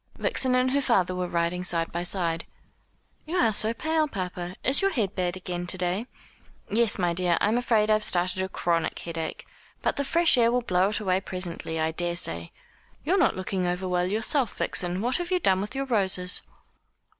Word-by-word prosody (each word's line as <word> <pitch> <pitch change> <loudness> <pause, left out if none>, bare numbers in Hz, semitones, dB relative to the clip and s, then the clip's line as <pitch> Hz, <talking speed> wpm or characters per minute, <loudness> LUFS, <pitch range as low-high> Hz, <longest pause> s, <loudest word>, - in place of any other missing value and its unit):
Vixen 255 -1 +2
and 255 0 +2
her 280 +1 +1
father 190 -9 +1
were 180 0 -2
riding 170 +1 -1
side 170 -2 +1
by 170 - -3
side. 170 -2 +1 0.8
"You 335 - -3
are 225 -9 +3
so 215 +2 +3
pale, 315 +6 0
papa. 180 -6 -5
Is 265 +8 +2
your 390 - +3
head 210 - -1
bad 180 -1 -2
again 175 -1 -5
to 185 - +1
day?" 180 +6 -2 0.6
"Yes, 225 0 +4
my 175 -3 0
dear. 175 -1 +1
I'm 215 +2 +2
afraid 225 -3 +2
I've 215 0 +3
started 180 -1 +2
a 190 - -3
chronic 170 -2 -1
headache. 165 -1 -5 0.4
But - - 0
the 280 - 0
fresh 325 -1 +4
air 230 0 +4
will 245 0 0
blow 185 -2 +2
it 210 - -2
away 190 -2 0
presently, 175 -4 -4
I 160 0 0
daresay. 160 - -2 0.6
You're 350 +5 +2
not 355 - +3
looking 185 -1 -2
over 180 +1 -2
well 180 0 0
yourself, 225 +5 -1
Vixen. 180 +1 0
What 245 +3 0
have 350 -1 -4
you 365 -1 +1
done 190 - +2
with 210 +6 -6
your 275 0 -2
roses?" 190 -7 +1
185 Hz, 195 wpm, -26 LUFS, 175-235 Hz, 0.8 s, Yes